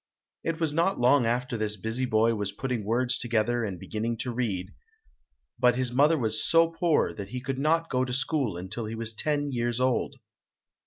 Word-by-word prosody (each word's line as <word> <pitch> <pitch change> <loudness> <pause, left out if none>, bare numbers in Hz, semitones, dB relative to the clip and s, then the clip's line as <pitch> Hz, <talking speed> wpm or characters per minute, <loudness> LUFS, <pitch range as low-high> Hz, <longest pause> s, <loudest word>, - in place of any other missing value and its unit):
It 165 0 -2
was 160 -3 0
not 170 +5 +1
long 125 +1 +4
before 120 0 -1
this 105 -1 -1
busy 115 +6 -2
boy 115 0 +3
was 105 -2 -2
putting 120 +1 -3
words 120 +4 0
together 120 0 0
and 95 -5 -4
beginning 115 +4 -3
to 125 -1 -3
read, 100 -6 -2 0.9
but 125 -1 +4
his 125 -1 -1
mother 145 +6 +4
was 110 -4 0
so 165 0 +4
poor 165 -1 +1
that 100 -2 -7
he 125 - -4
could 135 +1 -4
not 165 +3 +2
go 130 0 +2
to 130 - -3
school 130 - -1
until 105 +6 -5
he 110 - -5
was 115 0 -3
ten 145 +4 -1
years 120 -1 -1
old. 130 -1 +1
120 Hz, 195 wpm, -27 LUFS, 110-135 Hz, 0.9 s, long